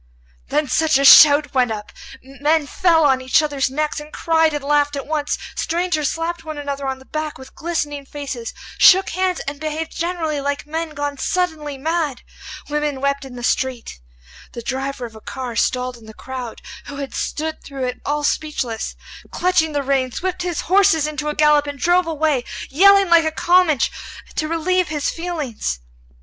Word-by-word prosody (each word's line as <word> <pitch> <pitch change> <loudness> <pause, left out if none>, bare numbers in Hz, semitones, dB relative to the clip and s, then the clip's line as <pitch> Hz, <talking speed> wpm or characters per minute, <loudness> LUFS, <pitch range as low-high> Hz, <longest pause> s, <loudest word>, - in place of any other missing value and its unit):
Then 295 +1 0
such 315 +2 +3
a 275 - +1
shout 290 +1 +8
went 255 -2 +2
up! 210 -1 -6 0.3
Men 290 +4 0
fell 330 +1 +3
on 265 -2 +3
each 260 +5 +3
other's 285 -3 0
necks, 300 +3 -2
and 300 +1 -11
cried 320 -1 +2
and 295 -2 -4
laughed 290 0 +2
at 275 - -4
once. 300 -1 -1 0.2
Strangers 335 -3 0
slapped 330 0 -3
one 310 -1 -6
another 280 -1 -4
on 265 0 -2
the 265 - -17
back 310 +1 -4
with 260 0 -13
glistening 295 -4 -3
faces, 270 -6 -6 0.3
shook 380 +1 +7
hands, 370 0 0
and 280 +1 -6
behaved 315 +1 -4
generally 330 -4 -2
like 285 +1 -2
men 320 +1 -4
gone 290 -1 -3
suddenly 315 -6 -2
mad. 310 -2 -2 0.4
Women 295 -2 -2
wept 280 0 -1
in 260 -2 -10
the 245 - -8
street. 250 - -2 0.5
The 235 - -7
driver 265 0 -3
of 225 -2 -11
a 220 - -12
car 250 -1 -6
stalled 250 +1 0
in 225 -2 -16
the 220 - -12
crowd, 255 -3 -7 0.2
who 285 - -8
had 280 -1 -6
stood 315 +1 -3
through 275 -2 -6
it 250 0 -3
all 295 +1 -1
speechless, 275 -7 -2 0.3
clutching 340 -3 +1
the 285 -1 0
reins, 265 +1 -1
whipped 365 -1 -2
his 350 -3 -2
horses 375 -4 +3
into 300 0 -3
a 300 - -3
gallop 300 -1 +4
and 285 -1 -5
drove 350 +4 +2
away, 305 -5 0 0.3
yelling 395 +4 +6
like 335 -1 +7
a 315 - +1
Comanche, 345 -3 +3 0.4
to 310 - -2
relieve 345 +2 +1
his 300 -2 -1
feelings. 305 - -4
295 Hz, 180 wpm, -20 LUFS, 270-320 Hz, 0.5 s, shout